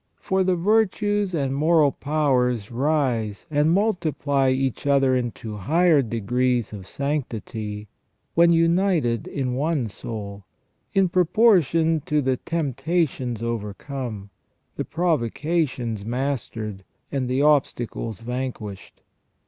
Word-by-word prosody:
For 190 -1 0
the 185 -1 +2
virtues 205 0 +1
and 135 -3 0
moral 155 0 +4
powers 125 -8 0
rise 125 -6 0
and 150 +1 +3
multiply 155 -8 +1
each 130 +1 -1
other 135 -2 +4
into 115 -3 -3
higher 160 - +3
degrees 120 +1 0
of 95 -3 -8
sanctity 110 -7 -4 0.5
when 170 +1 +5
united 165 - +2
in 130 -3 -2
one 145 -1 0
soul, 100 -1 -7 0.5
in 195 -1 +3
proportion 170 - +3
to 150 -2 +2
the 130 -2 +1
temptations 140 -6 -1
overcome, 115 -1 -5 0.4
the - - -3
provocations 145 - -1
mastered, 115 -5 -3 0.3
and 130 -3 -1
the 130 +3 +1
obstacles 120 -6 0
vanquished. 120 -4 -6
135 Hz, 105 wpm, -24 LUFS, 115-165 Hz, 0.5 s, when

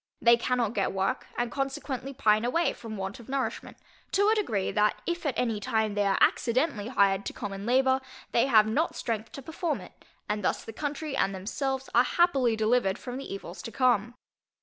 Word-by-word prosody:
They 235 +1 +6
cannot 235 -2 0
get 200 - 0
work, 195 +7 -1
and 240 0 -1
consequently 275 -1 -3
pine 215 -5 +2
away 295 +6 +1
from 220 -2 -8
want 190 +2 -5
of 235 - -13
nourishment, 265 -4 -3 0.4
to 405 +2 +4
a - - +5
degree, 220 - 0
that 210 0 +2
if 345 -2 -2
at 270 - -1
any 230 -4 0
time 220 +1 0
they 205 -1 +1
are 195 - +2
accidentally 240 -3 +2
hired 200 -5 +2
to - - -4
common 200 0 -6
labour, 260 +1 +3 0.3
they 235 - +3
have 220 -5 +6
not 285 +10 0
strength 225 -1 -3
to 275 - -8
perform 320 +2 -2
it, - - -14 0.2
and 210 -1 -2
thus - - -1
the 225 - -8
country 295 +2 -4
and 195 -6 +1
themselves 265 +7 -3
are 240 - +6
happily 270 -6 +2
delivered 220 -3 +2
from 250 0 -6
the 275 - -7
evils 195 -2 -7
to 230 - -7
come. 240 -1 +2
240 Hz, 195 wpm, -28 LUFS, 210-270 Hz, 0.4 s, They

